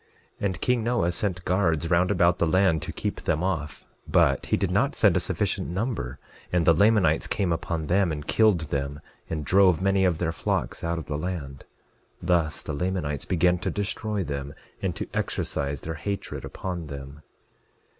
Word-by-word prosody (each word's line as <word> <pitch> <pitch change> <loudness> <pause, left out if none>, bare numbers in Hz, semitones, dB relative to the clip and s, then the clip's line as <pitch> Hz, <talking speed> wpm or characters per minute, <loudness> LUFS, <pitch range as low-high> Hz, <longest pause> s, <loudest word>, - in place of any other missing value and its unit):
11:17 - - -2
And 95 -2 -5
king 125 -2 +2
Noah 115 -7 +1
sent 90 0 -3
guards 85 -3 +1
round 90 +1 +4
about 90 -3 +3
the 85 - +3
land 90 -2 +3
to - - -4
keep - - -4
them 80 +3 0
off; 80 -6 -3 0.2
but 80 -4 +3
he - - +2
did - - 0
not - - +2
send - - +4
a - - +4
sufficient - - -1
number, 90 - -3 0.3
and 90 -2 +2
the 85 - +7
Lamanites 95 -3 +3
came 95 -4 0
upon 80 -1 -3
them 95 +2 +2
and 75 -1 -4
killed 105 -4 +3
them, 70 0 -2 0.3
and 75 -2 -3
drove 90 +1 +5
many 95 0 +2
of 90 -4 +2
their 80 0 0
flocks 80 - -2
out 85 0 -1
of 80 - -5
the 75 -1 -3
land; 75 -6 -5 0.5
thus 85 -4 0
the 75 - -4
Lamanites 75 -4 -2
began 90 0 +2
to - - -2
destroy 105 0 -2
them, 70 -2 -5 0.3
and - - -1
to - - -4
exercise 70 -1 -2
their 80 - -4
hatred 100 +6 -4
upon 90 -4 -5
them. 70 +1 -8
85 Hz, 185 wpm, -26 LUFS, 75-95 Hz, 0.5 s, the